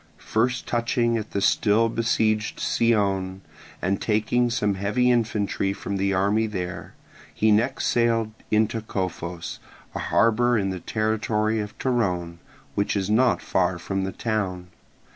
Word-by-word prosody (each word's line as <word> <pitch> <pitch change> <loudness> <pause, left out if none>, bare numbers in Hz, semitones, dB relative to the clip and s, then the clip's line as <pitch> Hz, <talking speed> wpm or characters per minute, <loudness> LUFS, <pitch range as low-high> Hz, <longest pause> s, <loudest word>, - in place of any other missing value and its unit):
First 120 +3 -1
touching 120 0 +1
at 110 - -7
the 100 - -2
still 110 +3 +3
besieged 110 -2 0
Scione, 95 -5 +1 0.4
and 95 +2 0
taking 115 +3 +1
some 105 -3 0
heavy 105 +6 +1
infantry 105 -4 0
from 100 0 -4
the 100 0 +1
army 100 +4 +2
there, 90 -4 -5 0.4
he 110 0 +2
next 120 +6 +1
sailed 115 -2 +2 0.2
into 110 +1 +1
Cophos, 90 -4 -4 0.3
a - - -4
harbour 120 +2 +3
in 95 -2 0
the 95 - -4
territory 110 +1 0
of 105 0 -6
Torone, 90 -9 -1 0.3
which 100 +1 0
is 100 0 -1
not 120 +2 +3
far 90 -1 +1
from 95 +2 -3
the 95 - -2
town. 95 -6 -3
105 Hz, 140 wpm, -24 LUFS, 95-115 Hz, 0.4 s, still